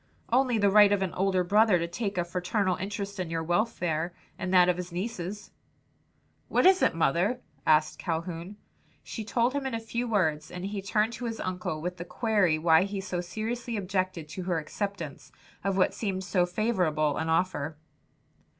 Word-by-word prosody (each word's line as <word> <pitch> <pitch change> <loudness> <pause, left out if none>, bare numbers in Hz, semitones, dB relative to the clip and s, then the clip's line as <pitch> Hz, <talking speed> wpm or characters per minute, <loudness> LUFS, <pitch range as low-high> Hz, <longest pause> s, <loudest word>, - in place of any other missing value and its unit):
"Only 255 -2 +3
the 205 -2 +3
right 205 0 +7
of 200 -1 +2
an 185 - -3
older 190 -1 +1
brother 210 +1 +4
to 170 0 -2
take 200 +3 -3
a 175 - +1
fraternal 180 +2 0
interest 200 0 -5
in 180 -3 -2
your 165 0 -2
welfare 175 -2 0 0.2
and 185 - -4
that 180 -1 +6
of 180 -1 +2
his 180 -1 -5
nieces." 195 +1 -5 1.0
"What - - +2
is 375 0 +6
it, - - +3
mother?" 175 - +1 0.3
asked 155 0 +3
Calhoun. 170 +3 -4 0.5
She 225 - -6
told 235 +3 +1
him 280 -1 -1
in 260 - -3
a - - -2
few 235 +2 -3
words, 155 -8 +1
and 180 +1 -6
he 200 0 -3
turned 210 +3 +1
to 245 - -5
his 225 -1 -4
uncle 180 -4 -3
with 180 +1 -3
the 175 - -5
query 205 -8 +2
why 160 0 +5
he 200 +1 -2
so 185 -2 -3
seriously 225 +5 -4
objected 185 -4 -2
to 185 - -6
her 175 -2 0
acceptance 170 -2 -5 0.3
of 195 0 0
what 185 - +3
seemed 190 -3 -2
so 180 -1 +1
favorable 175 -7 +1
an 160 - -2
offer. 160 -3 0
185 Hz, 185 wpm, -28 LUFS, 170-210 Hz, 1.0 s, right